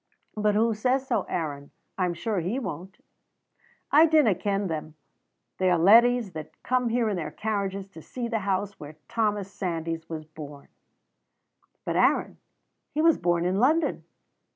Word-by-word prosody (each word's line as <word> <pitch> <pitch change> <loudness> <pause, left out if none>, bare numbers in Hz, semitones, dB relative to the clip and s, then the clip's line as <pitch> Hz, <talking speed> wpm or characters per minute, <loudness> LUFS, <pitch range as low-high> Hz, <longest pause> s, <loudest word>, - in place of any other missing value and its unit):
"But 210 -1 +1
who 225 +1 +3
says 255 +5 0
so, 230 -7 -1
Aaron? 145 -5 -3 0.3
I 185 - 0
am 175 -1 -2
sure 200 +4 -2
he 180 +9 -2
won't." 190 -6 -6 0.9
"I 315 +3 +7
dinna 305 -9 +4
ken 200 +2 -1
them. 155 -3 -4 0.6
They 185 0 +3
are 175 - +3
leddies 230 +4 +5
that 155 0 -9
come 250 -1 +1
here 235 0 +1
in 210 - 0
their 170 - -3
carriages 200 -2 -3
to 165 -4 -12
see 240 +8 -5
the 230 -1 -1
house 200 0 -2
where 150 +1 -9
Thomas 205 -3 -1
Sandys 165 -3 -4
was 155 -2 -6
born." 150 -2 -11 1.2
"But, - - -1
Aaron, - - +2 0.5
he 310 - -1
was 330 -2 +4
born 175 0 +1
in 185 +2 +1
London!" 310 +8 +2
195 Hz, 160 wpm, -26 LUFS, 170-230 Hz, 1.2 s, I